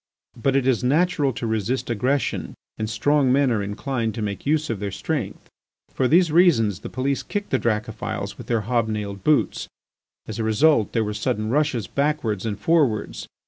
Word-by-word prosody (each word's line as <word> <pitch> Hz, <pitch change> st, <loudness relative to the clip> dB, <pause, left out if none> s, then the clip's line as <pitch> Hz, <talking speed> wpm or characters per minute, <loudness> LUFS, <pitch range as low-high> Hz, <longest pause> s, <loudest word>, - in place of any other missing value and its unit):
But 135 Hz, +3 st, 0 dB
it 135 Hz, -2 st, +2 dB
is 130 Hz, -2 st, +2 dB
natural 150 Hz, +1 st, +2 dB
to 115 Hz, -, -5 dB
resist 110 Hz, +3 st, -1 dB
aggression 125 Hz, +5 st, -1 dB, 0.2 s
and 110 Hz, 0 st, -2 dB
strong 135 Hz, +4 st, +2 dB
men 135 Hz, 0 st, +3 dB
are 110 Hz, -3 st, +1 dB
inclined 110 Hz, +2 st, -3 dB
to 110 Hz, -, -3 dB
make 100 Hz, +5 st, -4 dB
use 155 Hz, +1 st, +2 dB
of 110 Hz, -, -3 dB
their 100 Hz, 0 st, -3 dB
strength. 95 Hz, 0 st, -4 dB, 0.5 s
For 130 Hz, -, +1 dB
these 170 Hz, +3 st, +4 dB
reasons 135 Hz, -, +4 dB
the -, -, -7 dB
police 135 Hz, +2 st, -1 dB
kicked 205 Hz, -1 st, -4 dB
the 130 Hz, -, +2 dB
Dracophils 110 Hz, -2 st, -2 dB
with -, -, -11 dB
their 115 Hz, -2 st, +1 dB
hob 115 Hz, +1 st, 0 dB
nailed 105 Hz, -2 st, -4 dB
boots. 150 Hz, -1 st, +1 dB, 0.6 s
As 110 Hz, 0 st, -6 dB
a -, -, 0 dB
result 110 Hz, +2 st, +3 dB
there 115 Hz, -, +2 dB
were 105 Hz, 0 st, -3 dB
sudden 105 Hz, +1 st, -2 dB
rushes 130 Hz, -6 st, +1 dB
backwards 120 Hz, -8 st, -1 dB
and 105 Hz, -2 st, -3 dB
forwards. 145 Hz, -7 st, +1 dB
120 Hz, 185 wpm, -23 LUFS, 110-140 Hz, 0.6 s, these